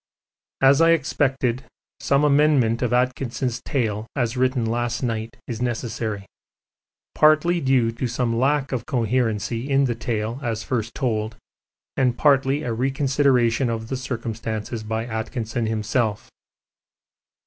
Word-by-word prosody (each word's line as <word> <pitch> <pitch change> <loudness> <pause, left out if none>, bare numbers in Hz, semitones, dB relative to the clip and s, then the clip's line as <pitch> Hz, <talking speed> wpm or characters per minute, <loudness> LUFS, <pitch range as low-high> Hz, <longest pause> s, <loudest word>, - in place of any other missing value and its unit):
As 135 +3 +6
I 165 0 +6
expected, 135 -4 0 0.4
some 140 +1 +2
amendment 140 -6 +3
of 125 - 0
Atkinson's 125 0 -1
tale 110 -5 -2
as 120 -3 -1
written 130 -1 +1
last 120 +2 -1
night 115 -1 -3
is 115 -1 -5
necessary, 110 -4 -3 0.9
partly 155 +3 +4
due 130 -4 +2
to 115 +3 -3
some 120 -1 -1
lack 135 +3 +1
of 125 -3 -3
coherency 115 0 -1
in 135 0 +3
the 120 - 0
tale 115 +1 -3
as 115 -4 -2
first 115 -3 -3
told 110 -4 -1 0.6
and 125 -2 +1
partly 140 -1 +3
a 120 - -2
reconsideration 130 -1 +2
of 110 -1 -4
the 130 - -1
circumstances 115 -3 -4
by 110 +1 -3
Atkinson 115 0 -3
himself. 110 0 -1
120 Hz, 125 wpm, -23 LUFS, 115-135 Hz, 0.9 s, As